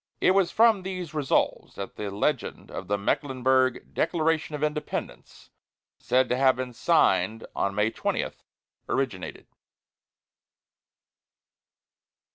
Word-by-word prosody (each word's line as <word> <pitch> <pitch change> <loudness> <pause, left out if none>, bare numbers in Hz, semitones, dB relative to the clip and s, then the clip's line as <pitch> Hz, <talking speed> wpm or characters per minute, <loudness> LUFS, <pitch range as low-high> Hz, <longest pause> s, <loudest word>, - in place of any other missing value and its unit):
It - - +4
was 190 -2 +3
from 225 -1 +4
these 185 -3 -5
"Resolves" 150 -4 0
that 100 - -6
the 105 -1 -4
legend 115 +7 -2
of 95 - -6
the 100 +1 +1
Mecklenburg 130 +3 +1
"Declaration 160 -2 0
of 150 - -4
Independence, 150 0 -4 0.5
said 130 0 +2
to 125 - +1
have 130 -1 +4
been 130 -1 -5
signed 115 -1 +2
May 105 +2 +1
20," - - -2 0.6
originated. 120 -9 -2
130 Hz, 105 wpm, -26 LUFS, 115-155 Hz, 0.6 s, It